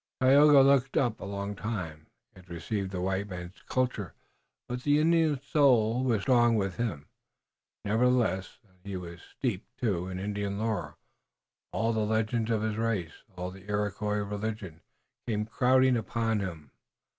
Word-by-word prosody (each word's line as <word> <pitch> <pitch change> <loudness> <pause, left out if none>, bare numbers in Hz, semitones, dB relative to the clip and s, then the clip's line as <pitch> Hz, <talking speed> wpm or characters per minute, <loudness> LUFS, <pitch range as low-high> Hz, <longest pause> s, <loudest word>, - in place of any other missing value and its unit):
Tayoga 140 +2 +7
looked 135 -1 +3
up 120 -4 +1
a - - -7
long 100 +1 -4
time. 90 -8 -5 0.3
He 95 - -16
had 90 0 -18
received 95 +4 -3
the 95 -1 -4
white 95 +2 -1
man's 90 0 -8
culture, 125 - -1 0.5
but 125 0 -4
the 145 +2 +3
Indian 160 -2 +3
soul 125 -5 +3
was 115 -6 +1
strong 120 -3 +4
within 100 +3 0
him, 75 -6 -9 0.8
nevertheless, 110 -3 +1
and 95 -1 -29
he 100 -1 -5
was 85 -1 -9
steeped, 115 -8 -4
too, 95 -7 -1
in 95 -1 -5
Indian 100 0 -3
lore. 100 -9 -2 0.7
All 115 +1 0
the 110 - 0
legends 110 +1 0
of 110 -2 +1
his 110 -1 -1
race, 105 -8 -2 0.2
all 90 +1 -4
the 95 +2 -14
Iroquois 105 0 -1
religion, 105 -5 -5 0.5
came 105 -2 -1
crowding 130 +2 +3
upon 115 -1 -1
him. 85 -8 -6
105 Hz, 155 wpm, -29 LUFS, 95-120 Hz, 0.8 s, Tayoga